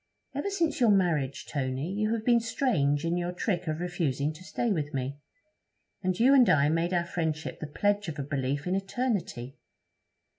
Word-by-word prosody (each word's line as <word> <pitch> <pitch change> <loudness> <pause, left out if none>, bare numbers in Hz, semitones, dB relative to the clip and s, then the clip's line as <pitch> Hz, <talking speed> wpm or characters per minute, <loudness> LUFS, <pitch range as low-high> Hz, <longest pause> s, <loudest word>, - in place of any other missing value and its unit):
'Ever 285 +8 -2
since 335 -6 0
your 240 -3 +5
marriage, 165 -9 +1
Tony, 135 +4 -2
you 215 +1 0
have 220 -1 -5
been 240 -1 +5
strange 170 - +1
in 170 +1 0
your 175 0 -1
trick 180 -1 -2
of 155 0 -2
refusing 155 -5 -1
to 165 +4 -13
stay 235 +4 -1
with 150 -5 -2
me. 135 +2 -3 0.8
And 185 -1 -1
you 255 +4 +6
and 250 -7 +6
I 145 -3 +4
made 165 +2 +1
our 175 -1 +1
friendship 160 -2 -3
the 155 - -5
pledge 205 +6 0
of 160 -2 -5
a 140 - -2
belief 140 0 -2
in 180 - 0
eternity! 195 - -2
175 Hz, 185 wpm, -28 LUFS, 145-205 Hz, 0.8 s, you